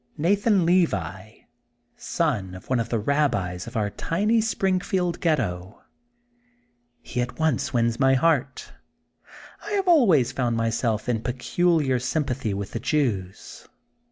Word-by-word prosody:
Nathan 195 +3 +2
Levi, 110 - 0 0.5
son 110 - -2
of 95 +7 -11
one 130 - +2
of 115 0 -3
the 115 - 0
Rabbis 105 -8 -1
of - - -5
our 105 -2 -1
tiny 210 - 0
Springfield 185 -4 -1
Ghetto. 105 - -2 1.2
He 125 - -3
at 125 0 -5
once 155 -4 0
wins 115 -2 0
my 135 -1 +4
heart. 140 -2 0 0.9
I 415 - -5
have 390 -2 0
always 190 - +4
found 125 -3 -1
myself 115 -1 -1
in 115 -3 0
peculiar 135 +2 0
sympathy 130 -3 -2
with 100 0 -4
the 115 - -4
Jews. 115 - -2
130 Hz, 130 wpm, -24 LUFS, 110-165 Hz, 1.2 s, my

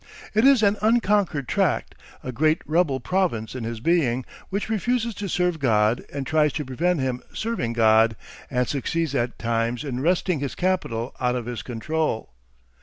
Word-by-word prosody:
It 215 +3 +3
is 270 -5 +6
an 205 0 +3
unconquered 205 - +2
tract, - - 0 0.3
a 130 - -4
great 155 +6 +1
rebel 155 -3 +1
province 120 - -1
in 125 -3 -5
his 115 0 -4
being, 130 -4 +1 0.2
which 200 +2 -2
refuses 230 +2 0
to 200 0 -5
serve 180 -1 0
God 110 -3 +2
and 140 -1 -4
tries 155 0 +2
to 150 - -3
prevent 165 +7 0
him 130 -2 -2
serving 220 - -2
God, 110 0 +4 0.3
and 125 -2 0
succeeds 150 +3 -1
at 120 -2 -1
times 115 +1 -1
in 130 -4 -3
wresting 175 +2 +1
his 140 -1 -4
capital 150 -11 -1
out 125 -1 +1
of 120 -2 -3
his 120 -1 -4
control. 125 - -2
140 Hz, 170 wpm, -24 LUFS, 120-180 Hz, 0.3 s, is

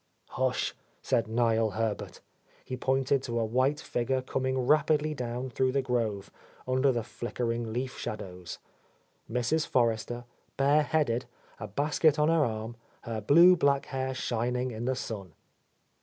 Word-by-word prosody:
"Hush," - - 0 0.3
said 115 -1 +1
Niel 115 -1 +2
Herbert. 110 -2 -3 0.4
He 130 - -4
pointed 135 +1 +1
to 120 -3 -2
a 115 - +1
white 130 +6 +1
figure 130 -2 -1
coming 130 0 -1
rapidly 150 +3 +2
down 125 -1 -4
through 130 +2 +1
the 135 -1 +1
grove, 115 -6 -1 0.4
under 130 +2 +3
the 120 -2 -1
flickering 120 0 -3
leaf 125 +3 -3
shadows, 90 -5 -6 0.4
— - - -23
Mrs. 150 +7 0
Forrester, 120 0 0 0.3
bareheaded, 140 -3 +2 0.3
a - - -5
basket 150 - +2
on 150 +1 +3
her 165 -2 +4
arm, 110 -1 -3 0.2
her 115 -2 -4
blue 170 - +7
black 140 -4 +2
hair 130 -1 -3
shining 125 +1 -1
in 115 +1 -5
the 130 +1 +1
sun. 100 -8 -6
125 Hz, 140 wpm, -29 LUFS, 115-135 Hz, 0.4 s, blue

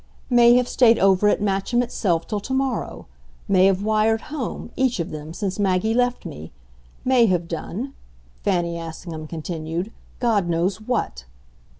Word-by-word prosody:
"May 240 0 +7
have 250 0 +3
stayed 235 -3 +4
over 195 +1 +4
at 205 - +2
Matcham 200 +5 +1
itself 180 -8 -1
till 210 -2 -2
tomorrow. 265 +4 -2 0.4
May 190 -2 +5
have 195 0 +1
wired 220 +1 +2
home, 255 -4 -4
each 260 -5 +1
of 170 +2 -3
them, 155 0 -7
since 190 +3 -4
Maggie 195 +2 +1
left 245 +1 0
me. 75 +2 -8 0.5
May 255 -3 +5
have 175 -3 0
done," 190 - -5 0.5
Fanny 170 -3 0
Assingham 160 -1 -7
continued, 165 +4 -4 0.3
"God 215 -8 +1
knows 180 +4 0
what!" 140 - -2
195 Hz, 150 wpm, -23 LUFS, 170-235 Hz, 0.5 s, May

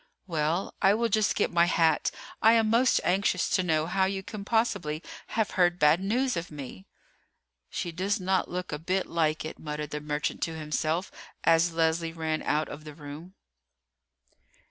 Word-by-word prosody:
"Well, 165 +1 -1
I 195 +2 +5
will 230 +1 0
just 215 0 +2
get - - +1
my 170 0 +4
hat. 165 -3 +2 0.3
I 225 +1 +7
am 225 -2 +3
most 240 +2 +4
anxious 185 0 +1
to 185 - +3
know 160 -3 +1
how 190 +3 +1
you 190 0 -2
can 210 0 -7
possibly 200 -9 0 0.2
have 220 -2 -1
heard 175 -1 +3
bad 150 +1 +5
news 245 +7 0
of 170 +1 -4
me." 135 -10 -9 0.8
"She 175 - -3
does 195 +6 -1
not 185 0 0
look 180 0 -4
a 150 - -3
bit 185 +4 -1
like 155 -2 0
it," 160 - -7
muttered 150 -1 -5
the 150 - -4
merchant 150 0 -2
to 165 - -2
himself 155 +3 -2 0.3
as 165 +1 +4
Leslie 165 0 +1
ran 160 -1 -2
out 150 +1 0
of 150 - -9
the 150 -1 -10
room. 155 +5 -10
170 Hz, 175 wpm, -28 LUFS, 155-195 Hz, 0.8 s, I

